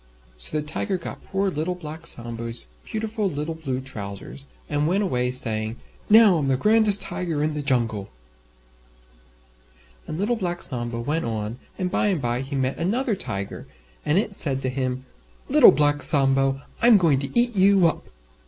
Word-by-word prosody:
So 60 - -3
the 150 - -5
Tiger 185 +5 -2
got 175 - -8
poor 195 0 -1
Little 165 +3 -2
Black 160 -2 -8
Sambo's 115 0 -4 0.2
beautiful 220 -2 -2
little 150 +1 -4
Blue 140 -6 -4
Trousers, 110 +1 -7 0.2
and 150 0 0
went 195 +5 +1
away 125 -9 0
saying, 110 -3 0 0.3
"Now 215 -4 +7
I'm 140 - -1
the 135 -1 +2
grandest 210 - +3
Tiger 165 -5 -2
in 155 0 0
the 150 - -3
Jungle." 115 -7 0 2.0
And 155 - -5
Little 215 +6 0
Black 175 -4 -3
Sambo 120 -2 -2
went 150 +7 -1
on 110 +1 -4 0.2
and 185 -2 -2
by 210 - +2
and 190 -5 +1
by 120 -1 -1
he 135 +1 -5
met 130 0 -1
another 220 +7 0
Tiger, 100 - -5 0.4
and 150 +3 +1
it 205 0 0
said 140 -8 +1
to 130 - 0
him, 130 0 -3 0.4
"Little - - +8
Black 145 +1 +2
Sambo, 135 -1 +2 0.2
I'm 235 -2 +7
going 160 -8 +3
to 140 - -1
eat 240 -1 +2
you 195 -1 +5
up!" 165 - +1
150 Hz, 170 wpm, -24 LUFS, 130-190 Hz, 2.0 s, Little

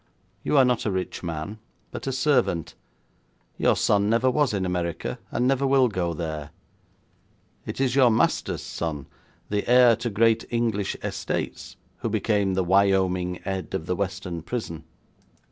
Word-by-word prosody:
You 150 - +1
are 135 - +7
not 125 -2 +1
a - - +1
rich 95 -1 -3
man, 85 +5 -5 0.3
but - - -6
a - - +1
servant. 130 - +1 0.9
Your - - +3
son 100 0 +2
never 120 +3 +3
was 145 0 +2
in 100 -3 -1
America, 85 -2 -3
and 125 - 0
never 135 +1 +2
will 135 -1 +4
go 85 -5 -2
there. 75 -2 -4 1.2
It - - -5
is 130 -2 +1
your 130 -3 +6
master's 110 - +1
son, 75 -5 -4 0.4
the 105 +1 -1
heir 125 -1 +7
to 120 +1 -3
great 115 +2 +3
English 115 -4 -1
estates, - - -4 0.2
who 115 - -3
became 105 -3 +1
the 95 - +1
Wyoming 95 -1 +2
Ed 95 0 -3
of 80 - -3
the 90 - -1
Western 95 -3 -3
prison. 85 -5 -5
100 Hz, 155 wpm, -25 LUFS, 90-120 Hz, 1.2 s, are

